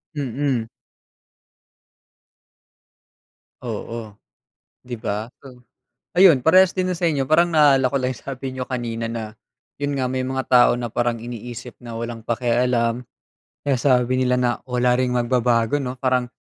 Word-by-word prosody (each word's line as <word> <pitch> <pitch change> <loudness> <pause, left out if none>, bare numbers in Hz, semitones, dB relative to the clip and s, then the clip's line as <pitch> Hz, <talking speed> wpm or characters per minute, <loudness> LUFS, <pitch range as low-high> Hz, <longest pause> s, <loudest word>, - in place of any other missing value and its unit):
Mm. 135 -3 -2 3.0
Oo, 115 -1 -6 0.7
di 125 -2 -7
ba? 110 +1 -4 0.2
O 125 -2 -14 0.5
ayun 175 -8 +7
parehas 185 +5 +5
din 185 -1 -1
na 180 - -2
sa 175 - -3
inyo 145 -4 +1
parang 170 +2 +3
naalala 140 -4 +5
ko - - +1
lang 130 -1 -1
sabi 135 +1 -6
niyo 125 - -3
kanina 115 -3 -4
na 110 -1 -6 0.4
yun 145 0 -1
nga, 130 -2 -1
may 130 - -1
mga 130 0 -2
tao 125 -1 +6
na 120 -1 -4
parang 120 -1 0
iniisip 120 +1 -8
na 115 -2 -8
walang 115 0 -5
pakialam, 120 0 0 0.7
eh, 135 -3 +2
sabi 125 -1 +2
nila 125 -1 +2
na 125 -1 +2 0.2
wala 125 -1 +1
ring 130 -1 +1
magbabago, 120 0 +1
'no, 125 -1 -4
parang 130 -1 +1
125 Hz, 145 wpm, -22 LUFS, 120-135 Hz, 3.0 s, ayun